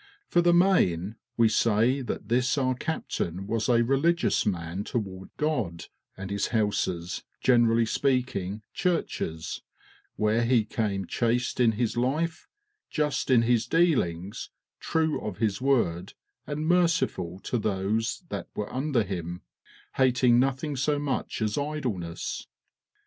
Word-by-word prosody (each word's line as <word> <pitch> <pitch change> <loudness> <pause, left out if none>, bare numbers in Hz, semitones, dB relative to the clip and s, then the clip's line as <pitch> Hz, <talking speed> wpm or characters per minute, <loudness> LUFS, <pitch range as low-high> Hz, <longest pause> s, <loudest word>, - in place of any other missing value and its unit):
For 175 - +2
the 175 0 +4
main, 115 - +3 0.2
we 115 -1 +5
say 115 +4 +2
that 120 -4 -5
this 125 +5 +2
our 130 -2 +2
captain 95 - -3
was 115 +3 -1
a 120 -1 +4
religious 140 +6 +2
man 90 0 -2
toward 95 -5 -4
God, 115 - -2 0.3
and 95 +1 -6
his 100 0 0
houses, 100 -6 -1 0.2
generally 115 -2 +4
speaking, 110 -6 -1
churches, 125 - -2 0.5
where 110 +2 +2
he 115 -2 +3
came 100 -3 -2
chaste 120 +6 0
in 115 -3 +4
his 115 +1 -1
life, 155 +7 -1 0.4
just 150 -3 -1
in 120 -3 +5
his 120 -1 +2
dealings, 105 - +1 0.3
true 160 -1 0
of 105 -4 -5
his 105 -2 0
word, 115 -11 +1 0.3
and 150 +1 -3
merciful 165 - +1
to 125 - -2
those 110 - -1
that - - -4
were 105 - -4
under 130 -3 +1
him, 90 -3 -5 0.5
hating 125 -2 +4
nothing 135 +3 0
so 145 +3 +1
much 140 -5 -2
as 105 +4 0
idleness." 125 - -3
120 Hz, 130 wpm, -27 LUFS, 100-140 Hz, 0.5 s, we